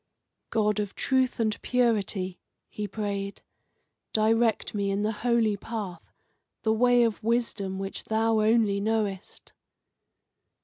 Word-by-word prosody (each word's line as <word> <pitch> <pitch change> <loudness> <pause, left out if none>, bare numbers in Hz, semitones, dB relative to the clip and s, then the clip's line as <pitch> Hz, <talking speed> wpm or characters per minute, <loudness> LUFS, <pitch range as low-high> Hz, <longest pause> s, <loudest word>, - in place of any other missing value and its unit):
"God 210 -1 +1
of 205 -2 -3
truth 260 -2 +1
and 220 -2 0
purity," 205 -7 0 0.3
he 210 -1 -4
prayed, 200 -1 -4 0.7
"direct 225 +1 +2
me 200 -1 -1
in 200 +1 0
the 215 - +1
holy 225 -1 +1
path, 200 -5 -6 0.5
the 220 - +3
way 245 +1 +4
of 225 -2 0
wisdom 215 -4 0
which 195 0 -5
Thou 220 0 +2
only 215 -2 +3
knowest." 210 -3 -2
215 Hz, 120 wpm, -27 LUFS, 200-225 Hz, 0.7 s, way